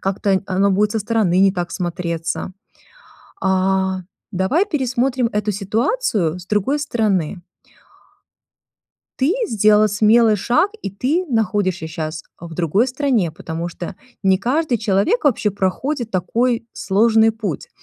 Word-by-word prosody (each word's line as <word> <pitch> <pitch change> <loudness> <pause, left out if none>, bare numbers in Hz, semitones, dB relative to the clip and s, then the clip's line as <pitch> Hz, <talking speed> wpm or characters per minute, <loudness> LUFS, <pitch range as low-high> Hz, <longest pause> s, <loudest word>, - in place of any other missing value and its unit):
как-то 195 +1 -1
н 190 - 0
оно 195 +1 +2
будет 205 +2 +2
со 220 - 0
стороны 210 -4 +1
не 195 - +5
так 175 -3 -3
смотреться. 175 -1 -3 0.9
А, 190 0 +1 0.3
давай 200 - +1
пересмотрим 260 -3 0
эту 210 0 0
ситуацию 205 - -1
с 180 - -13
другой 215 +8 0
стороны. 200 - -1 1.8
Ты 290 +9 +3
сделала 215 - +4
смелый 215 +2 +4
шаг, 300 - +1
и 200 - -4
ты 280 - -1
находишься 205 - 0
щас 155 -1 -5 0.2
в 170 -1 -9
другой 180 - +1
стране, 250 - 0
потому 165 +1 -5
что 175 +2 -7 0.3
не 190 -1 +3
каждый 255 - 0
человек 220 - +1
вообще 220 -6 +2
проходит 225 +6 -2
такой 230 +6 0
сложный 220 +2 +3
путь. 215 -8 -5
205 Hz, 130 wpm, -19 LUFS, 185-240 Hz, 1.8 s, не